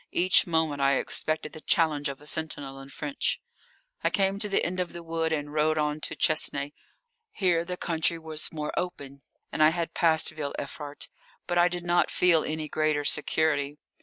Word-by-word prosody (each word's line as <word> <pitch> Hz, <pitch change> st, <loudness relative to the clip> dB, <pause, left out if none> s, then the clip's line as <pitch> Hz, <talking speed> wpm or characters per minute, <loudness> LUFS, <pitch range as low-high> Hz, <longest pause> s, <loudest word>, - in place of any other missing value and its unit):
Each 185 Hz, +1 st, +4 dB
moment 160 Hz, -4 st, +1 dB
I 140 Hz, 0 st, +4 dB
expected 155 Hz, +3 st, -1 dB
the 155 Hz, -, -9 dB
challenge 150 Hz, -4 st, +2 dB
of 140 Hz, -, -6 dB
a 150 Hz, -, -15 dB
sentinel 145 Hz, -3 st, -2 dB
in 135 Hz, 0 st, -10 dB
French. 280 Hz, -, -1 dB, 0.6 s
I -, -, +4 dB
came 195 Hz, 0 st, +1 dB
to 210 Hz, -, 0 dB
the 195 Hz, -, +2 dB
end 185 Hz, +2 st, -2 dB
of 180 Hz, -1 st, -2 dB
the 170 Hz, 0 st, -7 dB
wood 165 Hz, 0 st, -1 dB
and 145 Hz, -1 st, -2 dB
rode 155 Hz, +1 st, +2 dB
on 150 Hz, 0 st, 0 dB
to -, -, -2 dB
Chesnay. 145 Hz, -2 st, +1 dB, 0.6 s
Here 180 Hz, -, +2 dB
the 180 Hz, +1 st, -4 dB
country 165 Hz, 0 st, 0 dB
was 160 Hz, -1 st, -4 dB
more 150 Hz, -2 st, -4 dB
open, 140 Hz, -6 st, -4 dB, 0.3 s
and -, -, -1 dB
I 155 Hz, -, +8 dB
had 170 Hz, 0 st, -2 dB
passed 160 Hz, -2 st, +3 dB
Ville 150 Hz, -3 st, -4 dB
Evrart. 145 Hz, +1 st, -6 dB, 0.4 s
But 175 Hz, -1 st, +1 dB
I 175 Hz, -, +6 dB
did 175 Hz, -1 st, -4 dB
not 175 Hz, 0 st, +3 dB
feel 170 Hz, -3 st, +4 dB
any 155 Hz, 0 st, -3 dB
greater 155 Hz, -1 st, 0 dB
security. 150 Hz, -1 st, +1 dB
155 Hz, 190 wpm, -28 LUFS, 150-170 Hz, 0.6 s, I